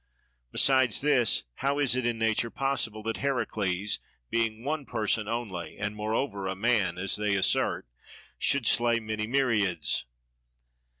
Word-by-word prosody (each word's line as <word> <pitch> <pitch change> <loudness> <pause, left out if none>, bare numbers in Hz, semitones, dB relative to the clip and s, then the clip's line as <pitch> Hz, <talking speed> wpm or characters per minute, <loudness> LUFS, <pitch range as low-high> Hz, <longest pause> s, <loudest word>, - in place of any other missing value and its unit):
Besides 130 -4 +4
this, 135 -6 +3
how 140 +1 0
is 140 -4 +3
it 130 -2 0
in 120 -1 -1
nature 115 +1 +1
possible 120 -6 -2
that 115 +1 -2
Heracles, 105 -8 -1 0.3
being 115 -1 0
one 150 +2 -2
person 110 -3 -1
only 105 -8 -4
and 105 +1 -3
moreover 105 -1 -2
a 95 - -2
man 100 -4 +1
(as 95 +1 +1
they 105 -1 0
assert), 95 - +1 0.5
should 140 -4 +2
slay 120 +1 +3
many 110 -1 -3
myriads? 105 - +1
115 Hz, 135 wpm, -28 LUFS, 105-125 Hz, 0.5 s, Besides